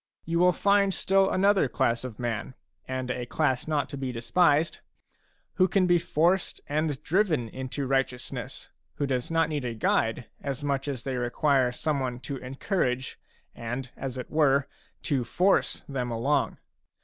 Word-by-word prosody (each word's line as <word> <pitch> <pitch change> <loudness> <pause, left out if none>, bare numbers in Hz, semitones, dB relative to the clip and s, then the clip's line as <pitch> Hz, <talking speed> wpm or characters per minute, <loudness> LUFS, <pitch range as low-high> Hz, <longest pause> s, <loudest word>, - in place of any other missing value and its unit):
You 170 +1 0
will 180 +1 +6
find 200 0 +3
still 195 0 +3
another 195 -4 +3
class 115 0 +1
of 125 -4 -6
man, 120 +1 -3
— - - -50
and 130 -1 -2
a 125 -1 -4
class 130 -2 0
not 150 -2 0
to 140 - -6
be 135 -2 -3
despised, 145 +7 +2 0.4
— - - -41
who 185 -1 +5
can 190 0 +2
be 175 -1 +4
forced 175 +4 +1
and 150 -1 -1
driven 165 - +1
into 130 +4 -4
righteousness, 135 -2 -2 0.2
who 145 - -1
do 130 -2 +1
not 165 0 +2
need 150 -3 -2
a 120 -2 -3
guide 115 +2 +1 0.2
as 140 0 -4
much 140 -1 -1
as 135 -4 -3
they 130 -2 -2
require 125 +1 +2
someone 130 -2 -2
to 135 +3 -5
encourage 130 0 -2 0.3
and, 120 +2 -5
as 130 -1 -5
it 125 - -6
were, 140 -3 +3 0.4
to 135 -4 0
force 180 +12 +2
them 130 -3 -3
along. 120 +6 0
135 Hz, 165 wpm, -27 LUFS, 125-160 Hz, 0.4 s, will